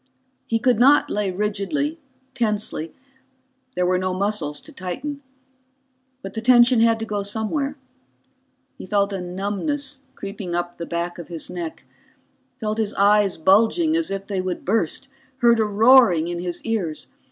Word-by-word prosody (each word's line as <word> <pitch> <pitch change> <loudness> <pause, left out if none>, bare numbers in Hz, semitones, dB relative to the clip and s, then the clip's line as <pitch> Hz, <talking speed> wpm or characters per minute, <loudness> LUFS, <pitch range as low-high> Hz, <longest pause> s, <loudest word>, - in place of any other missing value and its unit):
He 230 - +1
could 240 -1 +2
not 280 +4 +5
lay 205 -2 0
rigidly, 210 - -2 0.3
tensely 210 - -2 0.8
there 180 - +1
were 180 0 +2
no 185 0 -1
muscles 190 -7 -1
to - - -14
tighten. 265 +11 -5 1.0
But 195 - -7
the 220 - -4
tension 240 0 +5
had 230 0 +4
to - - -2
go 210 -2 -2
somewhere. 225 +8 -2 1.0
He - - -8
felt 200 +1 +1
a 190 - -3
numbness 205 - -3 0.2
creeping 195 -3 -5
up 175 0 -3
the 170 - -5
back 170 +1 -3
of 170 - -8
his 165 -3 -5
neck, 170 -3 -6 0.8
felt 215 -1 -2
his 215 -1 -1
eyes 205 -1 +3
bulging 225 - +3
as 330 -1 0
if 195 0 -4
they 195 -2 -2
would 185 -1 -4
burst, 220 +5 0 0.3
heard 235 -2 +4
a 220 - +3
roaring 210 -5 +5
in 175 0 -3
his 175 -1 -5
ears. 195 -9 -2
205 Hz, 155 wpm, -22 LUFS, 180-235 Hz, 1.0 s, not